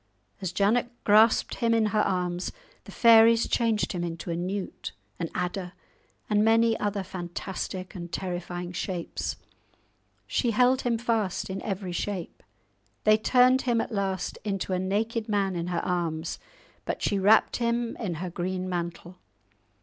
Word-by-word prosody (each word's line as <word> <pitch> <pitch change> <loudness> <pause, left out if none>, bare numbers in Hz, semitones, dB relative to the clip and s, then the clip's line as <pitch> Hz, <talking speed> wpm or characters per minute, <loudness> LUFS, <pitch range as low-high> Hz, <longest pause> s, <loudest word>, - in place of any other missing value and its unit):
As 185 -3 -2
Janet 210 +6 +2
grasped 220 +2 +4
him 230 -1 +2
in 225 -1 +3
her 215 - +4
arms 180 -2 -1 0.3
the - - -10
fairies 230 0 +6
changed 225 -3 +1
him 175 -1 -2
into 170 0 -4
a - - -1
newt, 185 - -4 0.3
an 165 -2 -2
adder, 180 0 -3 0.5
and 210 0 +3
many 225 +1 +4
other 205 -1 -1
fantastic 185 +1 -5
and 175 -3 -7
terrifying 175 -1 -4
shapes. 180 -1 -3 0.9
She 245 - 0
held 250 +4 +3
him 235 -2 0
fast 225 -5 -1
in 190 - -4
every 195 -3 -4
shape. 180 0 -4 0.6
They 215 0 +6
turned 255 +3 +4
him 240 -2 +1
at 225 - -2
last 195 -3 -2
into 195 -2 -2
a 180 - +1
naked 215 +4 -1
man 200 -3 +1
in 170 0 -3
her 175 -2 -2
arms, 165 -2 -2 0.4
but - - -4
she 200 - +1
wrapped 205 +3 +4
him 235 0 -1
in 190 -7 -3
her 175 +2 -5
green 185 +1 -3
mantle. 175 0 -5
195 Hz, 150 wpm, -27 LUFS, 180-225 Hz, 0.9 s, fairies